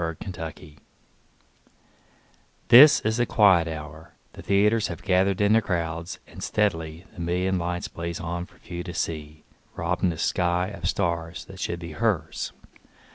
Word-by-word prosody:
Sara 80 0 -2
Teasdale 95 - -7
Broadway 80 -3 -8 1.9
THIS 145 +5 +9
is 110 +1 0
the 120 -1 +1
quiet 95 -6 +5
hour; 80 0 -8 0.2
the - - -10
theaters 105 +3 +2
Have 85 0 -7
gathered 95 0 +2
in 105 +1 +4
their 115 - +5
crowds, 85 -3 -3
and - - -12
steadily 80 -5 -1
The - - -13
million 90 +2 0
lights 85 +1 -3
blaze 85 0 -5
on 85 +1 -4
for - - -23
few 85 0 -7
to 85 - -7
see, 75 -1 -4 0.3
Robbing 90 +2 0
the 85 - -4
sky 90 +2 0
of 95 -4 -4
stars 85 -1 -2
that 95 -1 -12
should 85 - -2
be 85 -1 -7
hers. 95 -3 -1
85 Hz, 160 wpm, -25 LUFS, 80-95 Hz, 1.9 s, THIS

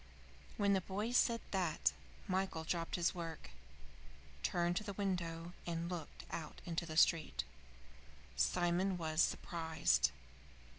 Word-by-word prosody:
When 200 -1 +4
the 190 - +3
boy 205 +5 -2
said 235 -1 +4
that, 165 - +2 0.3
Michael 185 -3 0
dropped 165 0 -1
his 175 0 +2
work, 165 - -6 0.9
turned 175 0 +1
to - - 0
the 205 -1 -4
window, 175 -4 -2
and 170 0 -2
looked 170 -4 -6
out 160 -2 -5
into 170 0 -2
the 155 -1 -4
street. 165 -1 +4 0.9
Simon 180 +2 +2
was 160 -1 +1
surprised. 160 - +2
175 Hz, 120 wpm, -37 LUFS, 165-190 Hz, 0.9 s, When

